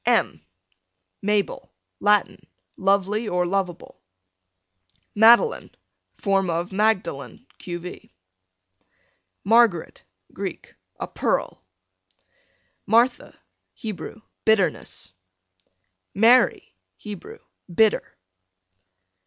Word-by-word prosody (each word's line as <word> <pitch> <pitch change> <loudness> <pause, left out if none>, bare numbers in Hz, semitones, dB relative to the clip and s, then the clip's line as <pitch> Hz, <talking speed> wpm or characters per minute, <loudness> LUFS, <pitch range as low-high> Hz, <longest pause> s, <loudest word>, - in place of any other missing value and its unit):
M 80 - +1 0.8
Mabel, 205 - -1 0.3
Latin, 205 -1 +1 0.3
lovely 200 +3 +1
or 180 -2 0
lovable. 180 - -3 1.1
Madeline, 235 - +5 0.5
form 195 -2 0
of 170 +2 -2
Magdalen, 190 - -1
q. 175 -1 -5
v. 180 +1 -10 1.3
Margaret, 220 -6 +3 0.3
Greek, - - -7 0.3
a - - -3
pearl. - - -2 1.2
Martha, 235 +4 +2 0.4
Hebrew, 220 0 -7 0.2
bitterness, 195 - 0 1.0
Mary, 235 +5 +4 0.2
Hebrew, 210 - -9 0.3
bitter. 215 - +1
200 Hz, 70 wpm, -23 LUFS, 180-220 Hz, 1.3 s, Madeline